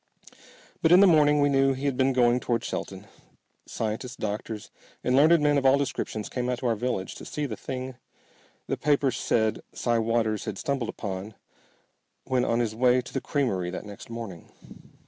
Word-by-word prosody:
But 160 - +3
in 180 - +8
the 200 - +8
morning 150 -4 +5
we 145 - +4
knew 135 -1 +3
he 135 +2 -5
had 140 -2 +1
been 130 +1 +2
going 125 -1 +3
toward 120 -2 -1
Shelton. - - -5 0.6
Scientists, 115 +3 -4
doctors, 105 0 -5 0.3
and 125 - +2
learned 160 +5 +6
men 145 -1 +4
of 135 - -5
all 135 +1 +6
descriptions 115 -6 -3
came 125 -1 -3
out 125 - 0
to 125 - -7
our 115 -2 +2
village 105 -4 -2
to - - -10
see 150 - -3
the 115 -6 -4
thing 130 +2 -6 0.7
the - - -2
papers 140 -4 +1
said 110 -2 +1
Si 120 -1 0
Waters 110 -2 0
had 105 -3 -4
stumbled 135 -2 -2
upon 100 +2 -5 0.9
when 130 -2 0
on 115 -1 +1
his 110 -2 -1
way 125 +2 +3
to 125 - -8
the 135 - -1
creamery 100 -12 -1
that 90 - -6
next 105 +1 -10
morning. 115 -7 -8
125 Hz, 185 wpm, -26 LUFS, 110-135 Hz, 0.9 s, in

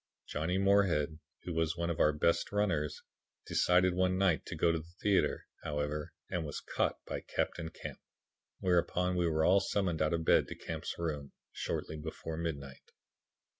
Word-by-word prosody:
Johnny 80 +5 -1
Moorhead, 95 -6 +3 0.2
who 90 - -4
was 80 +1 0
one 85 0 0
of 85 - -4
our 75 - +5
best 75 +3 +1
runners, 90 -8 0 0.4
decided 90 0 +3
one 95 0 +2
night 95 -4 +3
to - - -4
go 85 - +3
to 80 - 0
the 85 +2 -13
theatre, 100 -2 +2 0.2
however, 75 0 -2 0.2
and 90 - -2
was 75 -2 -4
caught - - -1
by - - -4
Captain 80 -2 -2
Camp, - - -8 0.6
whereupon 90 0 +2
we 90 -1 +2
were 80 -1 +2
all 95 +2 +6
summoned 95 -4 0
out 75 - +2
of 80 -1 -3
bed - - +5
to - - -6
Camp's - - -5
room, 75 -4 -3 0.2
shortly 80 - -3
before 80 +1 -5
midnight. 70 -5 -5
85 Hz, 170 wpm, -33 LUFS, 75-90 Hz, 0.6 s, all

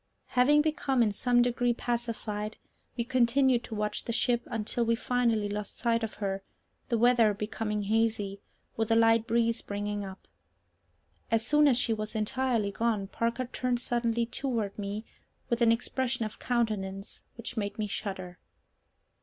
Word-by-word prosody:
Having 290 +4 +4
become 275 -5 +1
in 215 - +2
some 245 +4 +3
degree 245 0 +1
pacified, 225 -3 -3 0.4
we 235 - +1
continued 255 0 +3
to 220 - -6
watch 210 0 -2
the - - -2
ship 240 +1 +1
until 225 +1 -1
we 230 0 +2
finally 235 -3 +1
lost 205 0 -5
sight 230 -1 +1
of 220 - -3
her, 195 -2 -2 0.5
the 235 - +2
weather 230 -3 +4
becoming 210 0 -2
hazy, 210 -2 0 0.3
with 225 0 -1
a 225 - +4
light 225 0 +4
breeze 230 0 +2
springing 205 0 -3
up. 190 -1 -9 1.0
As 225 -1 +1
soon 300 0 +5
as 255 -4 +4
she 235 -2 +2
was 215 0 -4
entirely 220 -1 0
gone, 210 -2 -1
Parker 235 +3 -1
turned 245 0 -1
suddenly 235 -1 0
toward 230 -5 -2
me 205 +2 -4 0.5
with 235 0 +1
an 230 -1 +6
expression 245 +1 0
of 215 - -7
countenance 210 -5 -2
which 235 +1 -6
made 205 -3 -3
me 215 - -1
shudder. 190 -3 -5
230 Hz, 155 wpm, -29 LUFS, 210-240 Hz, 1.0 s, an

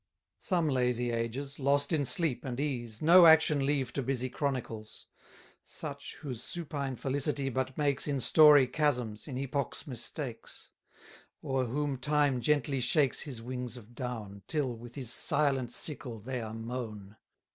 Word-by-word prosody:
Some 175 -6 +1
lazy 125 -3 +1
ages, 120 +5 -3
lost 140 +3 +2
in 145 -3 +1
sleep 160 -3 +1
and 130 -2 -4
ease, 120 -5 -3
No 170 +2 +8
action 155 -3 +5
leave 135 -4 0
to 140 - -1
busy 130 0 -1
chronicles: 125 -6 -4 0.6
Such, - - -7
whose 130 -6 -6
supine 145 -6 -4
felicity 140 +2 -1
but 130 +1 -2
makes 145 -2 +1
In 140 -2 0
story 150 +1 +7
chasms, 125 -6 -1
in 130 -4 -5
epoch's 140 0 -2
mistakes; 125 -1 -6 0.7
O'er 135 -1 0
whom 140 +3 -2
Time 145 -2 +2
gently 140 0 +1
shakes 130 +3 +2
his 125 -7 -6
wings 125 -1 -5
of 120 0 -14
down, 115 -6 -6
Till, 140 -6 -1
with 120 +1 -11
his 125 -5 -2
silent 140 -4 +1
sickle, 130 -4 -4
they 125 +3 -4
are 110 0 -6
mown. 110 -3 -6
130 Hz, 145 wpm, -31 LUFS, 120-145 Hz, 0.7 s, No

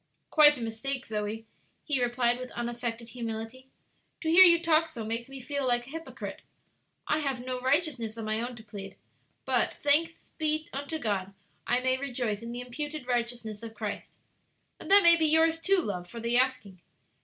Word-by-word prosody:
"Quite 295 -2 +7
a - - -7
mistake, 245 +4 -3
Zoe," 215 +1 -4 0.4
he 280 -5 -1
replied, 240 0 +2
with 255 0 -6
unaffected 235 -1 -4
humility; 230 +2 -6 0.5
"to 320 - 0
hear 365 +3 +9
you 340 -2 +7
talk 330 -1 +3
so 240 -8 -7
makes 230 +3 -4
me 270 0 -8
feel 275 +1 -3
like 240 -1 +1
a - - -13
hypocrite. 325 +1 -7 0.7
I 305 - +1
haves 275 -4 -2
no 255 -1 -3
righteousness 260 -5 0
of 225 - -5
my 215 +1 0
own 245 +1 -4
to 220 - -12
plead, 200 -3 -9 0.5
but, - - +2
thanks 310 +3 +3 0.3
be 310 0 0
unto 285 +4 -4
God, 200 -7 -2 0.3
I 245 +1 +2
may 260 0 +1
rejoice 245 -6 -2
in 230 0 -7
the 245 +1 -5
imputed 295 +3 -6
righteousness 235 -3 -2
of 225 -1 -9
Christ! 210 -1 -6 0.6
And - - -9
that 400 +1 +8
may 340 0 +8
be 320 -1 +2
yours, 320 +1 +3
too, 390 +4 +2
love, 180 -5 -5
for 235 - -8
the 235 +1 -1
asking. 250 -8 0
250 Hz, 185 wpm, -29 LUFS, 225-295 Hz, 0.7 s, hear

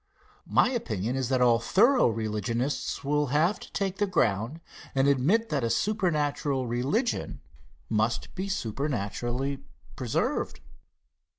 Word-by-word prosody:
My - - +4
opinion 115 - -2
is 130 -2 -1
that 130 -2 +3
all 120 -2 +5
thorough 235 - +4
religionists 115 +4 -2
will 150 +1 +1
have 155 +9 +2
to - - -12
take 195 -1 -2
the 205 - +1
ground 115 - 0 0.4
and 135 +1 +3
admit 160 - +2
that 140 -5 0
a 115 - +1
supernatural 145 - 0
religion 135 - -1 0.5
must 110 +2 0
be 190 +1 -4
supernaturally 125 - -2 0.4
preserved. 125 -4 -1
135 Hz, 120 wpm, -28 LUFS, 115-175 Hz, 0.5 s, all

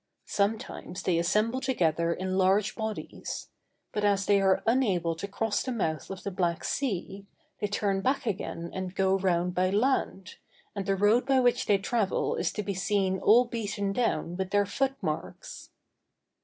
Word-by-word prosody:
Sometimes 200 -3 -2
they 170 -2 +2
assemble 215 +9 +1
together 170 - +1
in 185 +2 -2
large 195 +2 +3
bodies; 220 -1 -5 0.4
but 210 - -2
as 200 -1 +2
they 200 -1 +4
are 190 -1 +3
unable 195 -9 +2
to 180 +5 -5
cross 205 +1 -1
the 260 - -3
mouth 160 -10 -2
of 195 -1 -7
the 200 - -3
Black 175 -2 -1
Sea, 200 -6 -3 0.3
they 205 - 0
turn 200 -1 0
back 265 +4 0
again 175 -5 -3
and 185 0 -5
go 195 0 +2
round 180 -1 +1
by 185 +1 +2
land, 205 -3 0 0.4
and 200 -1 -4
the 195 - +2
road 210 +6 +3
by 270 -1 +4
which 245 -1 +2
they 205 - +5
travel 205 0 0
is - - -1
to 210 - -3
be 200 0 -2
seen 190 0 0
all 230 +6 +6
beaten 215 -4 -3
down 210 -7 0
with 190 -1 -2
their 205 +1 +3
foot 270 +6 -1
marks. 155 -3 -5
200 Hz, 170 wpm, -28 LUFS, 185-220 Hz, 0.4 s, all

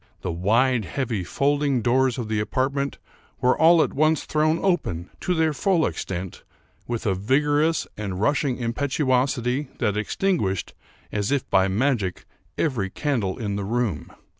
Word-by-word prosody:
The 90 - -3
wide, 115 +8 +2
heavy 115 -4 -2
folding 140 +4 +1
doors 130 +1 +2
of 120 -3 -3
the 110 -1 -1
apartment 135 +5 -1 0.4
were 125 0 +3
all 165 0 +6
at - - -3
once 155 +1 +2
thrown 155 +1 +2
open, 95 - -1
to 180 - -1
their 160 -1 +2
full 170 +3 +2
extent, 90 -1 -4 0.5
with 120 -1 -3
a 100 - +2
vigorous 145 - +1
and 100 -3 -4
rushing 140 +2 +1
impetuosity 130 +1 0
that 105 0 0
extinguished, 105 - -1 0.4
as 105 +3 -1
if 140 -2 0
by 95 -1 +4
magic, 105 -2 0 0.3
every 120 -11 0
candle 115 -6 -1
in 100 -3 -3
the 100 - -3
room. 110 -5 -2
125 Hz, 145 wpm, -24 LUFS, 105-145 Hz, 0.5 s, all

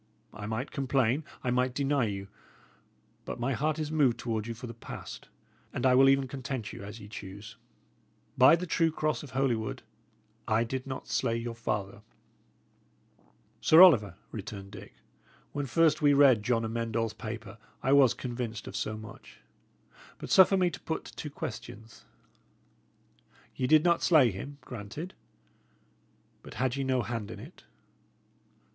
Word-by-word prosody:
I 105 -1 -7
might 110 +5 -3
complain, 135 0 +1 0.2
I 125 - 0
might 125 0 +1
deny 140 -2 +1
you; 100 -2 -4 1.0
but - - -6
my 130 +3 0
heart 150 +5 0
is 155 -1 -3
moved 140 -7 +3
toward 115 -3 -3
you 115 - -4
for 125 +3 -9
the 115 - -7
past, 115 - -9 0.4
and - - -3
I 130 - +5
will 135 +1 +6
even 135 0 +3
content 130 -4 -5
you - - -8
as 105 +3 -8
ye 100 - -10
choose. 100 0 -9 0.8
By 130 +5 +7
the 175 +2 -4
true 165 -1 +2
cross 155 0 -1
of 145 - -10
Holywood, 125 -4 -1 0.6
I 110 +1 +2
did 130 +3 -4
not 130 -1 -6
slay 115 - 0
your 115 0 -4
father." 105 -1 -4 1.6
"Sir 165 +3 +8
Oliver," 115 - +6 0.2
returned 100 -2 -7
Dick, 100 -2 -11 0.6
"when 145 -1 -3
first 155 +5 +3
we 145 -1 +5
read 135 -6 +6
John 115 0 0
Amend 115 0 -3
All's 115 -2 0
paper, 110 -2 -7 0.2
I 135 - +3
was 135 -4 +6
convinced 120 -3 -5
of - - -8
so 110 0 -2
much. 110 0 -12 0.8
But - - -8
suffer 190 +1 +7
me 180 -2 +2
to 135 - -8
put 160 - -5
two 150 - -6
questions. 115 -4 -8 1.5
Ye 130 - -1
did 155 +2 +5
not 170 -1 +3
slay 145 -9 +5
him; 140 +10 -8
granted. 125 - -7 1.3
But - - -12
had 125 +2 0
ye 140 - -2
no 130 -2 +1
hand 110 -2 -4
in 110 - -8
it?" 145 - -13
125 Hz, 160 wpm, -29 LUFS, 110-140 Hz, 1.6 s, Sir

